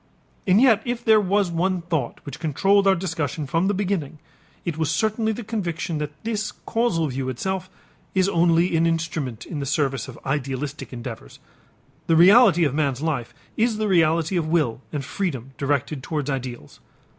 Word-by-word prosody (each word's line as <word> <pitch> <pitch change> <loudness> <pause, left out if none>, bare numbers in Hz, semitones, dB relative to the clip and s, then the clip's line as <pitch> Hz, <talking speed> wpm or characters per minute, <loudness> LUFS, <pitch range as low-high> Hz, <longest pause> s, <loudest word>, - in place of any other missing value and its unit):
And 190 +2 +5
yet 230 -4 +5
if 240 -1 -4
there 220 -2 +6
was 200 -1 +1
one 180 +1 0
thought 160 -8 -3
which 140 +2 -7
controlled 195 +6 +2
our 195 - +5
discussion 160 -5 -3
from 165 +7 +1
the 205 - +2
beginning, 185 -7 -2 0.5
it 170 -3 -2
was 160 -1 -1
certainly 220 +7 +1
the 230 +2 -5
conviction 175 -7 -3
that 150 0 -6
this 215 -2 -2
causal 225 -9 +1
view 130 -1 -3
itself 185 +9 -3 0.5
is 185 0 +3
only 170 -1 +3
an 165 +1 +3
instrument 160 -8 -2
in 155 - -5
the 140 - -3
service 135 -2 0
of - - -10
idealistic 140 +1 -3
endeavors; 120 - -8 0.7
the 165 - +4
reality 185 +1 +7
of 145 -4 +1
man's 140 -2 0
life 140 -7 -2 0.2
is 225 -1 +1
the 215 0 0
reality 165 -1 +2
of 165 -2 -1
will 155 -8 +1
and 145 -3 -3
freedom 135 - -3
directed 140 0 -1
towards 145 +1 -3
ideals. 125 - -6
165 Hz, 170 wpm, -23 LUFS, 140-195 Hz, 0.7 s, reality